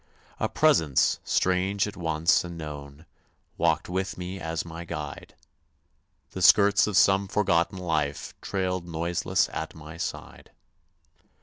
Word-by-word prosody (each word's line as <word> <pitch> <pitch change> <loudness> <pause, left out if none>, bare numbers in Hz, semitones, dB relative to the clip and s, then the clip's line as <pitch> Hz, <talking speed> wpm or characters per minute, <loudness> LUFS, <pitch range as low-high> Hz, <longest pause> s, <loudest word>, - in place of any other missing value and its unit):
A - - 0
presence, 75 -5 +3
strange 95 +2 +1
at 105 - -7
once 80 -1 +2
and 85 -1 -8
known, 75 -1 -8 0.5
Walked 80 -1 +1
with 95 +1 -3
me 90 +1 -6
as 80 0 -3
my 85 0 -7
guide; 75 -4 -7 1.0
The 95 - -6
skirts 100 +2 +6
of 105 -3 0
some 95 0 +4
forgotten 95 -2 +1
life 80 -5 -2
Trailed 95 -2 -2
noiseless 85 +1 0
at 80 0 -5
my 80 +1 -10
side. - - -6
85 Hz, 125 wpm, -26 LUFS, 80-95 Hz, 1.0 s, skirts